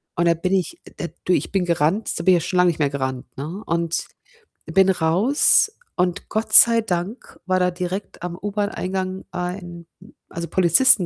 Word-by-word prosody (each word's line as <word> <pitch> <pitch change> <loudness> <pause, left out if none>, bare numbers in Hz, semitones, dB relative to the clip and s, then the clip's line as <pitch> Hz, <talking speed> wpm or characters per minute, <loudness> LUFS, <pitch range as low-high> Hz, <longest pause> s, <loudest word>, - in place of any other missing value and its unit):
und 170 - 0
da 170 - +4
bin 185 +3 -2
ich 195 - -1 0.2
da - - -4 0.2
du, 180 - +2
ich - - -1
bin 190 -2 0
gerannt 170 +5 0
so 170 - -2
bin 185 0 +5
ich 165 - -3
ja - - -5
schon 180 - -1
lang 180 0 +4
nicht 165 -2 -1
mehr 145 -2 +1
gerannt, 130 -2 -4
ne, 160 +9 -6
und 170 0 -2 0.6
bin 190 +4 +3
raus 190 - +4 0.2
und 180 +1 -2
Gott 220 +1 -3
sei 230 -1 +8
Dank 190 +3 -5
war 185 0 +1
da 180 0 +2
direkt 180 +2 -6
am 175 -1 -5
U-Bahn-Eingang, 190 -2 -3
äh, - - -5
ein 175 -1 -6 0.4
also, 170 0 -6
Polizisten 185 +3 +5
180 Hz, 190 wpm, -21 LUFS, 170-195 Hz, 0.6 s, sei